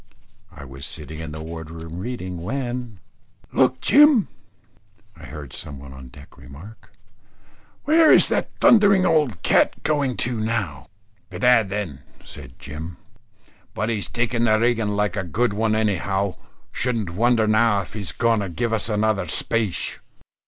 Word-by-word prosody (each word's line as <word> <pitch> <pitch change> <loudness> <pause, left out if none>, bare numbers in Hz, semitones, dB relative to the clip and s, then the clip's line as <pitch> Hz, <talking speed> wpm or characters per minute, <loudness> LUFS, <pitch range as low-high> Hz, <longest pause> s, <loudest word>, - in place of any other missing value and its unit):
I 70 - -11
was 70 +1 -8
sitting 80 0 -7
in 80 -1 -6
the 80 +1 -7
ward 80 -1 -8
room 80 +1 -8
reading, 95 -6 -5
when 125 0 -4 0.5
"Look - - +2
Jim!" 285 - +5 0.9
I - - -13
heard 75 -4 -9
some 70 - -8
one 65 0 -11
on 65 -1 -11
deck 70 +2 -16
remark. 75 - -13 0.9
"Where 315 +2 +5
is - - +7
that - - 0
thundering 200 -4 +5
old 150 - +1
cat - - +2
going 140 -6 0
to 120 -2 -3
now?" 100 -11 -3 0.4
"Bedad 125 -5 +3
then," 95 -9 -4 0.2
said - - -12
Jim, 80 +4 -8 0.8
"but 110 +2 -1
he's 110 -3 -2
taking 120 0 0
the 110 -1 +3
rigging 115 -2 +1
like 105 0 0
a 95 - -2
good 100 +6 0
one 110 +1 0
anyhow. 100 -2 0 0.4
Shouldn't 115 -8 -2
wonder 115 +4 +2
now 110 -1 +3
if 90 - -11
he 105 - -6
was 95 -8 -3
going 115 +7 +1
to 100 -2 -3
give 115 +6 -2
us 110 0 0
another 105 -3 0
spache." 110 +3 -1
105 Hz, 155 wpm, -22 LUFS, 85-120 Hz, 0.9 s, is